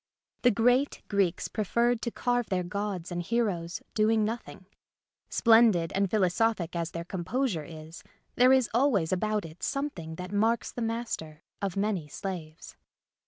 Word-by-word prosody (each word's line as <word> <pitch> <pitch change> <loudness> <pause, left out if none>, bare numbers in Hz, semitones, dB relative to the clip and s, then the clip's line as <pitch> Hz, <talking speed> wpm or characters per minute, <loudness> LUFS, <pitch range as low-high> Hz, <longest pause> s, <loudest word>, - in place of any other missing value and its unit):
The 250 - +6
great 245 +5 +2
Greeks 195 -4 +1
preferred 235 +3 +1
to 235 - -1
carve 245 0 0
their 185 -2 0
gods 190 -1 -4
and 175 0 -2
heroes 180 -5 -1
doing 220 0 +3
nothing. 220 -3 -5 0.6
Splendid 225 -8 +5
and 195 0 +1
philosophic 190 -2 +1
as 170 -1 -1
their 170 0 -5
composure 185 - -2
is 160 0 -10 0.3
there 250 +1 +5
is 260 -3 +4
always 225 - +2
about 210 +1 0
it 160 +1 -12
something 230 - -3
that 180 +2 -7
marks 225 +3 +1
the 245 - -6
master 225 -10 -4 0.2
of 195 -2 -2
many 195 -6 0
slaves. 165 -1 -7
200 Hz, 145 wpm, -28 LUFS, 175-230 Hz, 0.6 s, The